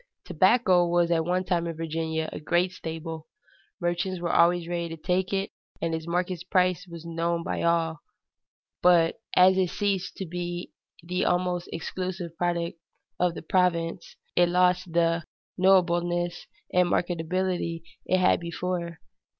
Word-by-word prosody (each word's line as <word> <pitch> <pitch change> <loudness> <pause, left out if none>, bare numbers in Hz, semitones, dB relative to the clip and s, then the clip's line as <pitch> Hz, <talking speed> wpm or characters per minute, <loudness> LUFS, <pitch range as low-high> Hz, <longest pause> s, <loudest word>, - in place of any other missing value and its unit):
Tobacco 185 0 +4
was 170 0 +2
at 165 -1 +2
one 180 +1 +1
time 175 -2 0
in 165 -1 -5
Virginia 160 0 -2
a - - -5
great 175 +4 +1
staple. 160 -2 -6 0.5
Merchants 175 +2 -1
were 170 0 -2
always 170 0 +4
ready 170 -1 -2
to 165 - -6
take 180 +3 0
it, 195 0 -1 0.3
and 165 - -1
its 160 0 -4
market 180 0 -1
price 185 0 +2
was 170 -1 -10
known 170 0 -1
by - - -3
all; 165 -1 +1 0.8
but 175 +1 +4
as 185 +1 +6
it 185 -2 +2
ceased 195 -2 -2
to 190 - -4
be 175 0 -5 0.3
the 180 +2 -1
almost 180 0 0
exclusive 175 0 -4
product 170 -1 -1 0.4
of 175 -1 +1
the - - -7
province, 170 -1 0 0.2
it 175 0 +4
lost 180 0 +2
the 165 0 +2 0.3
knowableness 175 -2 +2 0.3
and 180 -1 +4
marketability 175 0 -1 0.2
it 185 - +3
had 185 0 +3
before. 170 0 -4
175 Hz, 145 wpm, -27 LUFS, 170-180 Hz, 0.8 s, as